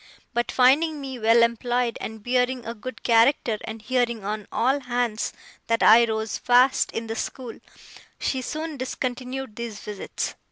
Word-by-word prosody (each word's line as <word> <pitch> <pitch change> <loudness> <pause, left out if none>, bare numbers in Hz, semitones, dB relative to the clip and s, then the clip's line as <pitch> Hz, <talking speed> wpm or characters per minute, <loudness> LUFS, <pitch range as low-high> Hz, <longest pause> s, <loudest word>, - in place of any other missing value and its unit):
But, 240 0 0
finding 290 +5 +4
me 265 -3 -6
well 230 +1 +5
employed, 240 +1 0
and 220 -1 -7
bearing 250 0 0
a 230 - -4
good 255 +3 -9
character, 230 -1 +3
and 220 -1 -7
hearing 240 -2 0
on 210 0 -4
all 265 +4 +1
hands 245 -4 -1 0.4
that 230 0 +1
I 235 +2 +8
rose 220 -1 -3
fast 250 +2 +4
in 225 - -4
the 225 0 -4
school, 240 +1 -5 0.6
she 260 - -1
soon 310 +2 -4
discontinued 255 -1 -4
these 235 -3 -5
visits. 210 -2 -5
240 Hz, 155 wpm, -24 LUFS, 225-255 Hz, 0.6 s, I